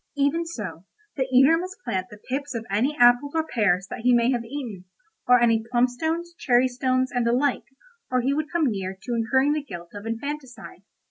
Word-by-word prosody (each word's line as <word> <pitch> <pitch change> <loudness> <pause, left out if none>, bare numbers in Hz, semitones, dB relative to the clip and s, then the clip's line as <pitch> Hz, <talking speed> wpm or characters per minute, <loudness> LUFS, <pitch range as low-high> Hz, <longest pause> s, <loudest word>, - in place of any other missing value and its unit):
Even 295 +4 +1
so 210 - -7 0.3
the 265 -2 -1
eater 270 +6 +5
must 370 +2 -6
plant 185 -1 -2
the 210 - -12
pips 270 +4 -5
of 225 -1 -4
any 255 +9 +1
apples 245 +5 +5
or 320 -1 +1
pears 200 - +1
that - - -5
he 245 +1 +3
may 240 +1 +3
have 240 -2 -1
eaten, 230 -7 -7 0.4
or 250 0 +6
any 230 -2 +3
plum 245 0 +3
stones, 325 +7 -3
cherry 250 -1 +3
stones, 255 +1 0
and 245 -3 0
the - - +3
like, 270 +2 +1 0.4
or 255 0 +1
he 270 +3 +1
would 305 +1 -2
come 340 -3 +1
near 190 -2 -4
to 240 +5 -5
incurring 265 +5 +2
the 305 - -1
guilt 175 -10 -9
of 205 +2 -8
infanticide. 265 +2 -6
250 Hz, 205 wpm, -24 LUFS, 230-285 Hz, 0.4 s, or